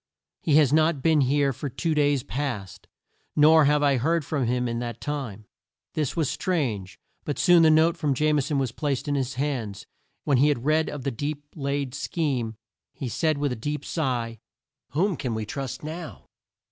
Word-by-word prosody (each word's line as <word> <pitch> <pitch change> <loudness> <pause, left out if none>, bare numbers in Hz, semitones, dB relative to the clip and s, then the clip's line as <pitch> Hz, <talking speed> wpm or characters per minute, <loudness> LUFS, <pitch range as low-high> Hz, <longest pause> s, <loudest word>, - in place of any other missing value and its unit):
He 150 - +2
has 150 -3 +5
not 155 -3 +3
been 160 -2 +4
here 140 +1 +2
for 140 +4 -5
two 160 +6 -1
days 145 -3 +2
past; 120 -9 -4 0.5
nor 155 +1 +6
have 150 +1 +3
I 140 -2 +3
heard 160 +4 +1
from 140 -5 -1
him 125 +1 0
in 115 0 -2
that 120 -1 -5
time." 130 -8 -5 0.5
This 150 -4 -1
was 160 -4 +1
strange; 120 - -2 0.2
but 145 - -3
soon 175 -2 +6
the 160 - +6
note 160 +2 +4
from 150 -5 0
Jame 150 +1 +2
son 145 +1 -1
was 135 -3 0
placed 145 +1 -2
in 145 - 0
his 135 -1 -1
hands, 125 -8 -2
and - - -36
when 140 - +2
he 145 - +5
had 135 -4 0
read 155 +1 +2
of 145 -3 -6
the 140 - -1
deep 145 +4 -4
laid 140 -3 -2
scheme, 135 -7 -2 0.4
he 130 - -4
said 155 +5 +1
with 145 -1 0
a - - -1
deep 145 +6 -4
sigh, 120 -7 -2 0.5
"Whom 185 +5 +1
can 125 -5 -3
we 110 -1 -3
trust 135 +4 -5
now?" 160 +2 -7
145 Hz, 195 wpm, -25 LUFS, 125-155 Hz, 0.5 s, nor